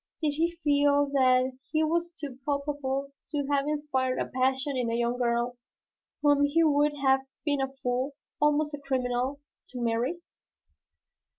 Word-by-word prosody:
Did 305 -3 +1
he 335 +3 -1
feel 285 -1 +3
that 255 -1 +3
he 315 0 +2
was 340 +2 0
too 275 -4 -7
culpable 280 -1 -2 0.2
to 290 -2 -1
have 280 0 +2
inspired 290 -4 0
a - - 0
passion 265 +2 0
in 245 -2 0
a 230 - 0
young 240 +1 0
girl 240 0 0 0.7
whom 290 -1 +5
he 300 +4 +3
would 295 -1 +3
have 265 0 +5 0.3
been 285 -2 +1
a 270 0 -1
fool, 255 +3 -1 0.3
almost 300 0 +2
a 290 - -4
criminal, 260 0 -1 0.3
to 250 - -7
marry? 235 +7 0
280 Hz, 155 wpm, -28 LUFS, 255-295 Hz, 0.7 s, whom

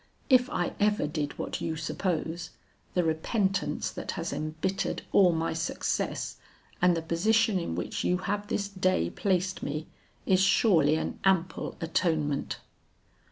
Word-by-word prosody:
'If 255 0 +6
I 175 - -1
ever 210 -4 +2
did 150 -1 -3
what - - -4
you 160 - -2
suppose, 165 0 -2 0.5
the 180 - +3
repentance 190 +5 0
that - - -5
has - - -3
embittered 160 +5 -2
all 185 -3 +6
my 165 0 -1
success, 160 +1 -2 0.4
and 180 -1 +4
the 165 - -3
position 210 +5 +2
in 125 - -3
which 90 - -3
you 180 - +2
have 205 +2 -2
this 200 -1 -1
day 185 - +1
placed 185 -1 0
me, 150 +2 -3 0.4
is 185 -1 +4
surely 175 -6 +4
an 160 - -3
ample 185 -2 +1
atonement.' 160 -3 0
175 Hz, 140 wpm, -29 LUFS, 160-195 Hz, 0.5 s, If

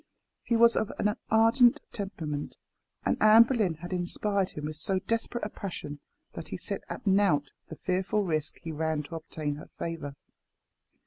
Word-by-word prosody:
He 235 - 0
was 235 0 +6
of 215 - 0
an 210 0 +1
ardent 230 +2 +5
temperament, 160 -8 -4 0.5
and - - 0
Anne 215 +2 +9
Boleyn 225 -9 0
had 175 +4 -7
inspired 190 +2 0
him 150 - -6
with 155 0 -5
so 190 +5 0
desperate 230 +4 -2
a - - -3
passion 160 -8 -6 0.3
that - - -7
he - - -5
set - - -5
at - - -6
nought 190 -8 +3 0.2
the 160 - -7
fearful 190 +5 0
risk 155 -4 -1
he 165 - -4
ran 155 -1 -1
to 165 - -8
obtain 155 -2 -4
her 150 - -11
favour. 155 -4 -4
185 Hz, 170 wpm, -29 LUFS, 155-215 Hz, 0.5 s, Anne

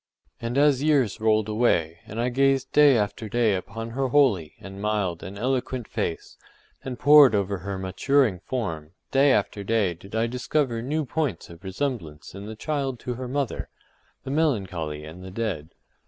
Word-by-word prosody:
And 115 +2 -2
as 140 -2 +4
years 140 -8 +2
rolled 110 -1 +3
away, 90 -7 +1
and 110 +1 -6
I 120 +1 +1
gazed 135 +1 +2
day 145 -4 +6
after 105 +1 -2
day 115 -1 +2
upon 115 +5 -5
her 135 +3 -1
holy, 120 - +2
and 95 0 -9
mild, 100 -5 -1
and 100 +2 -8
eloquent 125 0 -2
face, 100 -7 -4 0.5
and 130 -2 -5
poured 145 -5 +7
over 100 -1 -1
her 100 +2 -5
maturing 100 +3 +1
form, 85 -9 -4 0.2
day 135 +1 +5
after 100 -3 0
day 105 -3 +1
did 95 +5 -11
I 110 +1 +2
discover 125 0 -1
new 150 +5 -1
points 135 - -3
of 85 +2 -14
resemblance 95 - -4
in 100 +2 -8
the 110 - -7
child 135 -1 -2
to 125 - -3
her 125 +1 -6
mother, 135 -1 -2 0.5
the 135 - -5
melancholy 95 - -1
and 85 +4 -10
the 95 - -8
dead. 95 -7 -3
115 Hz, 170 wpm, -25 LUFS, 95-135 Hz, 0.5 s, poured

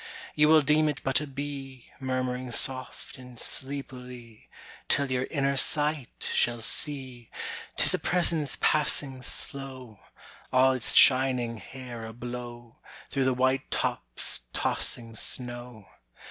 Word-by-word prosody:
"You 150 0 +4
will 155 -1 +7
deem 155 +2 +3
it 145 - -3
but 135 +2 +2
a 150 - -5
bee, 135 -2 -7
Murmuring 130 -1 -2
soft 130 +1 0
and 125 -1 -12
sleepily, 125 -4 -6 0.4
Till 140 -1 +3
your 130 0 0
inner 140 -2 0
sight 150 -2 +1
shall 120 0 +1
see 130 -1 -1 0.5
"'Tis - - +6
a - - +1
presence 170 -5 0
passing 140 -3 +2
slow, 130 -4 -4 0.5
All 130 +1 +5
its 130 -3 0
shining 130 -3 +5
hair 120 +1 -9
ablow, 120 0 -8 0.3
Through 135 -2 +1
the 130 -1 +2
white 130 +1 +1
tops' - - 0
tossing 115 -1 -2
snow. 120 -2 -5
130 Hz, 120 wpm, -28 LUFS, 120-140 Hz, 0.5 s, will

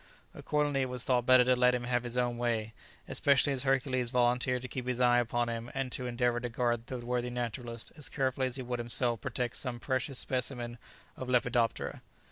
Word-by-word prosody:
Accordingly 145 -2 0
it 130 - -1
was 125 -1 +1
thought 125 -2 +1
better 130 -1 +7
to 125 +1 +4
let 125 0 +4
him 120 - -3
have 120 0 0
his 120 0 -3
own 120 -1 0
way, 110 -2 -1 0.3
especially 140 0 +3
as 130 - 0
Hercules 130 -2 +1
volunteered 125 +1 +2
to - - -4
keep 125 0 -5
his 125 -1 -1
eye 120 -1 +5
upon 120 0 0
him, 115 0 -4
and 135 -2 -2
to 125 0 -3
endeavour 120 0 +1
to 125 0 -4
guard 120 0 -1
the 130 - -4
worthy 125 0 -2
naturalist 120 -1 -4
as 150 -2 -3
carefully 130 -1 0
as 130 - -4
he 130 - -4
would 125 0 -3
himself 120 0 +1
protect 125 -1 -2
some 125 -3 -3
precious 130 +1 -2
specimen 120 -2 -2 0.4
of 130 - -6
a - - -1
lepidoptera. 120 -2 +1
125 Hz, 210 wpm, -31 LUFS, 120-130 Hz, 0.4 s, better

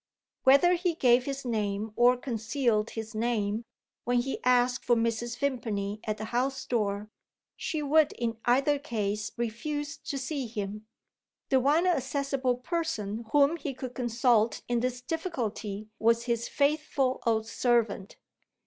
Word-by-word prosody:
Whether 280 +7 +6
he 355 -1 0
gave 250 -5 +4
his 275 -1 -4
name 210 -2 -2
or 245 +1 +5
concealed 230 -2 0
his 220 0 -6
name, 220 -1 -1 0.4
when 245 +1 +1
he 255 +3 -2
asked 250 0 +3
for 240 - +3
Mrs. 230 +1 -1
Vimpany 215 -7 -2
at 215 -1 -2
the 215 - -5
house 265 +2 0
door, 210 -2 -1 0.4
she 310 -3 -3
would 300 +1 +4
in 230 -2 -3
either 275 +4 +3
case 210 -6 -2
refuse 285 +6 -3
to 280 - -5
see 270 -1 -3
him. 210 -1 -5 0.6
The 265 - +4
one 295 +7 +3
accessible 275 -5 0
person 245 - -3
whom 290 +3 +4
he 285 -4 -5
could 255 -1 -6
consult 240 -2 +2
in 240 -1 +1
this 250 +1 -2
difficulty 230 - -4
was 230 +1 +3
his 235 -1 -1
faithful 280 -3 +1
old 220 -1 +2
servant. 225 -4 0
245 Hz, 140 wpm, -29 LUFS, 220-275 Hz, 0.6 s, Whether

